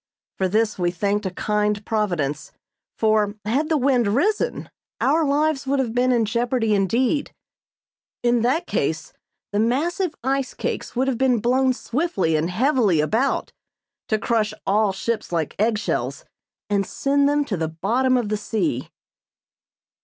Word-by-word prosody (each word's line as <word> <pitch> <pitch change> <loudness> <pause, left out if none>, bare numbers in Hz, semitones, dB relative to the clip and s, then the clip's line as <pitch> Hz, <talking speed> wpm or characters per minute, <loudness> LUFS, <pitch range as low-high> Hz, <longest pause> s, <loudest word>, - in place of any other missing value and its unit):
For 190 - +2
this 215 +1 0
we 175 -1 +2
thanked 200 +3 -1
a - - -1
kind 210 +2 -1
Providence, 175 -10 -1 0.5
for, 215 -2 +2
had 275 +9 0
the 315 - +3
wind 255 -4 +2
risen, 345 - 0 0.3
our 310 +4 +3
lives 290 -1 +1
would 280 +1 +1
have 250 -4 -1
been 250 +1 +2
in 235 -3 +2
jeopardy 235 0 0
indeed. 235 - +1 0.9
In 240 -1 +3
that 260 +9 +1
case - - -2 0.4
the 205 - 0
massive 315 - 0
ice 270 0 -1
cakes - - -4
would 260 +2 +1
have 255 -3 -1
been 260 -2 +3
blown 255 +4 +2
swiftly 245 - -1
and 155 +3 0
heavily 220 - +2
about 220 - 0 0.5
to 215 - +1
crush 215 -1 0
all 205 +1 +2
ships 215 +3 -3
like 165 -3 -1
egg 220 +1 +2
shells 210 - -3 0.4
and 200 -1 +1
send 280 0 +1
them 290 0 +1
to 215 - -2
the 160 -2 -1
bottom 250 +11 +1
of 235 -4 -1
the 215 - 0
sea. 225 +9 -2
230 Hz, 155 wpm, -22 LUFS, 205-265 Hz, 0.9 s, the